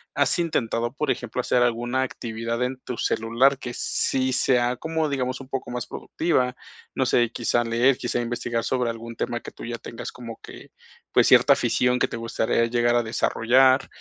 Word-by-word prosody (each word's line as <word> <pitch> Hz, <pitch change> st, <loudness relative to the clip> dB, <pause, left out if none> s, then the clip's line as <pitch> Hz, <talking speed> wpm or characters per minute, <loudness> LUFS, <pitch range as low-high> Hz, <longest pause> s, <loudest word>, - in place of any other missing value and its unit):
¿has -, -, +2 dB
intentado, 120 Hz, -8 st, -1 dB
por 150 Hz, +3 st, -1 dB
ejemplo, 120 Hz, 0 st, -4 dB
hacer 125 Hz, 0 st, +1 dB
alguna 120 Hz, +2 st, +1 dB
actividad 115 Hz, -2 st, -4 dB
en 130 Hz, +1 st, -2 dB
tu 125 Hz, -, -5 dB
celular 120 Hz, +5 st, +2 dB
que 125 Hz, -2 st, -6 dB
sí 130 Hz, 0 st, 0 dB
sea 125 Hz, -1 st, +2 dB
como, 160 Hz, +4 st, -2 dB
digamos, 130 Hz, -3 st, -2 dB
un 135 Hz, -, -10 dB
poco 135 Hz, -2 st, -4 dB
más 125 Hz, 0 st, -3 dB
productiva?, 130 Hz, -7 st, -1 dB, 0.4 s
no -, -, +1 dB
sé, 120 Hz, -1 st, +3 dB
quizá 120 Hz, 0 st, 0 dB
leer, 120 Hz, +3 st, +3 dB
quizá 120 Hz, 0 st, -2 dB
investigar 120 Hz, -1 st, -2 dB
sobre 125 Hz, -1 st, 0 dB
algún 115 Hz, 0 st, -7 dB
tema 120 Hz, 0 st, -3 dB
que -, -, -9 dB
tú -, -, -12 dB
ya 120 Hz, 0 st, -4 dB
tengas 115 Hz, 0 st, -8 dB
como 115 Hz, -2 st, -9 dB
que, -, -, -12 dB, 0.4 s
pues, -, -, +4 dB
cierta -, -, +7 dB
afición 125 Hz, 0 st, +1 dB
que -, -, +2 dB
te -, -, -6 dB
gustaría 115 Hz, 0 st, 0 dB
llegar 120 Hz, 0 st, +1 dB
a 120 Hz, -, +3 dB
desarrollar, 130 Hz, +3 st, +3 dB
120 Hz, 185 wpm, -24 LUFS, 115-130 Hz, 0.4 s, cierta